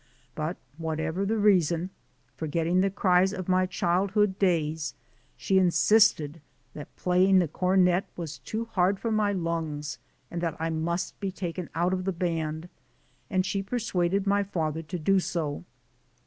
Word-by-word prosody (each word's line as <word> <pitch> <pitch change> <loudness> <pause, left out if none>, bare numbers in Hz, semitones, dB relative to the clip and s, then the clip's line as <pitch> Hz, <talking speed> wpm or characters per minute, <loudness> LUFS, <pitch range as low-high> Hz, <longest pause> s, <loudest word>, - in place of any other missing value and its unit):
But 155 +5 -3 0.2
whatever 160 +4 -2
the 225 +2 0
reason, 180 -4 +2 0.4
forgetting 165 +3 0
the 195 - +2
cries 190 -1 +3
of 185 -3 -5
my 185 0 +3
childhood 190 +3 +1
days, 160 -6 0 0.4
she 190 -1 +2
insisted 175 -4 +3 0.3
that 150 - -10
playing 185 +1 +3
the 180 -2 +3
cornet 180 +2 +2
was 165 -3 -6
too 225 +1 -4
hard 190 -3 +1
for 230 - -2
my 215 -1 +2
lungs 160 -6 -3 0.3
and 170 - -3
that 165 -2 -2
I 165 +1 -1
must 170 +3 -2
be 195 -2 -2
taken 180 -2 -5
out 175 +3 +1
of 185 -1 -2
the 195 - +1
band, 165 -2 -2 0.6
and 185 -2 +1
she 195 +1 -1
persuaded 195 -3 -1
my 200 0 +3
father 160 -5 -2
to 165 +3 -5
do 190 +4 +3
so. 160 -5 -3
180 Hz, 150 wpm, -27 LUFS, 165-195 Hz, 0.6 s, cries